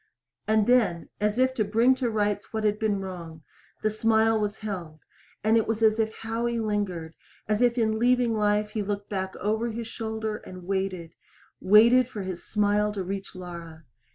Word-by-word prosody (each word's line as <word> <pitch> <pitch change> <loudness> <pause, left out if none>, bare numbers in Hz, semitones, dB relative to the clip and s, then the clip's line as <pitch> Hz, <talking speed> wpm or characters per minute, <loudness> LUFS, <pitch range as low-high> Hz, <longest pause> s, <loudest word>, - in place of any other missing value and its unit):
And, 215 -1 +3 0.5
as 210 +1 0
if 260 0 +3
to 230 - +1
bring 225 +5 +4
to 245 - +1
rights 205 -2 -1
what 220 -1 -2
had 210 0 +1
been 210 -3 0
wrong, 170 -4 -8 0.4
the 215 - +2
smile 220 0 +3
was 210 0 -3
held, 170 -7 -5 0.4
and 220 +1 +3
it 225 - +1
was 225 0 -1
as 220 0 +4
if 220 0 +1
Howie 230 +1 -1
lingered, 200 -7 -2 0.3
as 210 +2 +1
if 245 0 +3
in 220 -2 +1
leaving 245 -1 +3
life 210 0 +1
he 215 - -2
looked 200 0 -4
back 190 -1 -3
over 220 +3 -1
his 230 +1 -5
shoulder 220 -1 -4
and 185 -3 -11
waited 190 -3 -3 0.5
waited 235 +5 +6
for 205 -5 -5
his 185 -2 -5
smile 210 0 +1
to 195 -2 -3
reach 195 +1 -5
Laura. 170 -3 -9
210 Hz, 180 wpm, -26 LUFS, 195-225 Hz, 0.5 s, waited